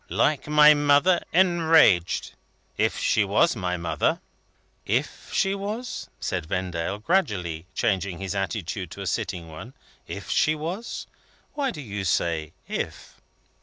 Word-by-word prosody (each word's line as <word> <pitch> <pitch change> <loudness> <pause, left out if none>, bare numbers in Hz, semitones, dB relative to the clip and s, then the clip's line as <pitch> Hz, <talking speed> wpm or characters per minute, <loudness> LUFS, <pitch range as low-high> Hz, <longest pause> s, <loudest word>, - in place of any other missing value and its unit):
Like 150 -1 +1
my 150 0 +7
mother 145 +5 +3
enraged 165 - +4 0.4
if - - +1
she - - +2
was - - +3
my 90 0 -2
mother." 80 -3 0 0.6
"If - - -2
she 195 - +1
was?" 210 +5 -5
said 90 -4 -3
Vendale, 90 0 -2
gradually 100 - -1
changing 95 -5 0
his 95 0 -4
attitude 95 -2 -3
to 100 - -9
a - - -5
sitting 90 -1 -3
one. 110 +12 -10 0.3
"If - - -7
she 155 - +3
was? 175 +10 -5 0.5
Why 285 -2 -1
do 150 - -6
you 105 -6 -5
say 80 -3 0 0.2
'if'?" - - -5
105 Hz, 130 wpm, -25 LUFS, -, 0.6 s, my